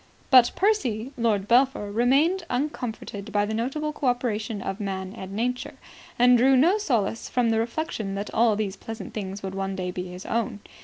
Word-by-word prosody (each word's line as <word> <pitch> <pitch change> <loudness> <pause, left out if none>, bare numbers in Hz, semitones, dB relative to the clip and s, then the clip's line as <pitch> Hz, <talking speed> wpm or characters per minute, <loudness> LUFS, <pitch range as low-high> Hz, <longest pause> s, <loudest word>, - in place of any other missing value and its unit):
But 250 -2 +7
Percy, 265 - +1
Lord 215 -4 0
Belpher, 240 -4 +3
remained 275 - +3
uncomforted 240 -6 -4
by 205 0 +2
the 215 - -3
notable 275 +7 -2
co 285 - -2
operation 230 -3 -1
of 195 +1 -4
Man 190 -2 -4
and 190 -4 -8
Nature, 250 +4 -2 0.4
and 245 0 +6
drew 265 +2 +5
no 350 +11 +4
solace 230 - -1
from 240 -2 +1
the 225 - +2
reflection 230 -4 -3
that 200 +1 -5
all 225 -1 +4
these 205 -2 -2
pleasant 225 -2 -8
things 195 -1 -5
would 190 -1 -4
one 195 0 -3
day 180 -1 -3
be 180 0 -5
his 180 +1 -9
own. 225 -3 -2
225 Hz, 185 wpm, -25 LUFS, 200-250 Hz, 0.4 s, But